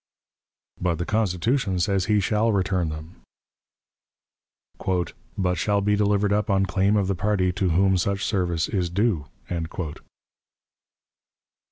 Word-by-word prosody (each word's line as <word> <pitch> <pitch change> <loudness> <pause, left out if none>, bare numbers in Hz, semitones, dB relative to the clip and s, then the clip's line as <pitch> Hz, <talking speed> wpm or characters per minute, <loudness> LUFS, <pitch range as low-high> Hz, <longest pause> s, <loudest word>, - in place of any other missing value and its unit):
But 90 -2 +1
the 85 +2 -3
Constitution 105 0 0
says 95 +1 +1
he 105 -1 +3
shall 110 +3 +1
return 95 -4 0
them 75 +2 -9 2.2
"but 90 -2 +1
shall 105 -1 +2
be 105 +1 +2
delivered 105 0 +2
up 105 +1 0
on 95 0 +3
claim 100 +2 +2
of 100 -2 +2
the 95 - 0
party 95 -1 +1
to 95 0 0
whom 95 +3 +3
such 100 +3 -1
service 90 -5 0
is 90 -4 -1
due." 95 -4 0
95 Hz, 125 wpm, -24 LUFS, 90-105 Hz, 2.2 s, he